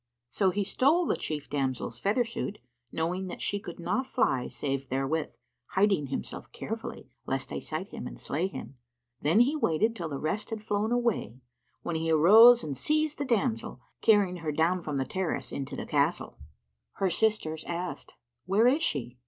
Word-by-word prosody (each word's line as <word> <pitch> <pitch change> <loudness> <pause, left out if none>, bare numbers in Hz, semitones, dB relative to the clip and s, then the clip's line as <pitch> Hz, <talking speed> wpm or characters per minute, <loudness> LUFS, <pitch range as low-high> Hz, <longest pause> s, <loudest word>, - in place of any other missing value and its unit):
So 190 +10 +2
he 200 +2 0
stole 285 - +3
the - - +1
chief 150 -2 -4
damsel's 135 -3 -2
feather 210 +5 +2
suit, 225 -3 -4 0.3
knowing 180 +4 -2
that 180 - -7
she 205 - -1
could 175 -3 -9
not 215 +10 -1
fly 130 - +1
save 135 -2 -3
therewith, 135 +4 -1 0.4
hiding 190 -7 +3
himself 135 - -5
carefully - - -6 0.2
lest - - -2
they - - -3
sight - - -5
him - - -6
and - - -9
slay 165 +7 -1
him. 140 -7 -9 0.4
Then 165 +10 +4
he 275 +5 +3
waited 220 - +1
till 170 -6 -4
the 140 - -3
rest 155 +9 -2
had 220 -2 -5
flown 210 +1 0
away, 235 - 0 0.4
when 170 - -2
he 165 0 -1
arose 220 +10 +8
and 145 -3 -4
seizing 310 - +1
the 285 - -1
damsel, 230 0 -2 0.2
carried 200 -5 +4
her 160 -2 -2
down 165 +4 +1
from 150 -4 -3
the 135 - 0
terrace 185 +5 -3
into 135 -1 -4
the - - -5
castle." - - 0 0.5
Her 190 -2 0
sisters 170 -6 0
asked, 175 +1 -5 0.3
"Where 200 +5 +4
is 275 +6 +4
she?" 125 - -2
185 Hz, 175 wpm, -29 LUFS, 150-220 Hz, 0.5 s, arose